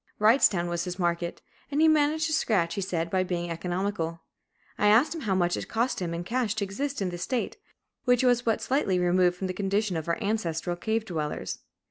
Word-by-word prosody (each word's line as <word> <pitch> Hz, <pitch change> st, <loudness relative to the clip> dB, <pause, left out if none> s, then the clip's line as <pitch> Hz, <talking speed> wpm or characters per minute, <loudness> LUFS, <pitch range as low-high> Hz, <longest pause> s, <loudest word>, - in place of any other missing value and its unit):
Wrightstown 210 Hz, -5 st, +4 dB
was 175 Hz, 0 st, -2 dB
his 180 Hz, 0 st, -4 dB
market; 170 Hz, -1 st, -1 dB, 0.3 s
and 290 Hz, +1 st, -1 dB
he 320 Hz, -, +6 dB
"managed 310 Hz, 0 st, +3 dB
to 315 Hz, -, -1 dB
scratch," 200 Hz, -, +1 dB
he 200 Hz, -, -2 dB
said, 170 Hz, -3 st, -2 dB
by 185 Hz, -, +2 dB
being 175 Hz, -2 st, -3 dB
economical. 175 Hz, -1 st, -2 dB, 0.5 s
I 210 Hz, -, +2 dB
asked 225 Hz, +10 st, +5 dB
him 330 Hz, -, -6 dB
how 200 Hz, -7 st, 0 dB
much 175 Hz, -1 st, +2 dB
it -, -, -5 dB
cost 230 Hz, -1 st, 0 dB
him 170 Hz, -2 st, -2 dB
in 170 Hz, +1 st, -3 dB
cash 230 Hz, +1 st, -1 dB
to 215 Hz, -, -1 dB
exist 270 Hz, +5 st, -3 dB
in 185 Hz, -, -1 dB
this 175 Hz, -1 st, -6 dB
state, 255 Hz, +2 st, -2 dB, 0.5 s
which 245 Hz, -1 st, +3 dB
was 245 Hz, -1 st, +4 dB
but 225 Hz, -2 st, 0 dB
slightly 255 Hz, -9 st, +1 dB
removed 180 Hz, 0 st, +3 dB
from 190 Hz, -, -3 dB
the 185 Hz, -, -2 dB
condition 200 Hz, +1 st, 0 dB
of 160 Hz, 0 st, -3 dB
our 170 Hz, -, +1 dB
ancestral 180 Hz, -6 st, -1 dB
cave 220 Hz, +5 st, -1 dB
dwellers. 155 Hz, -6 st, -4 dB
190 Hz, 210 wpm, -27 LUFS, 175-230 Hz, 0.5 s, he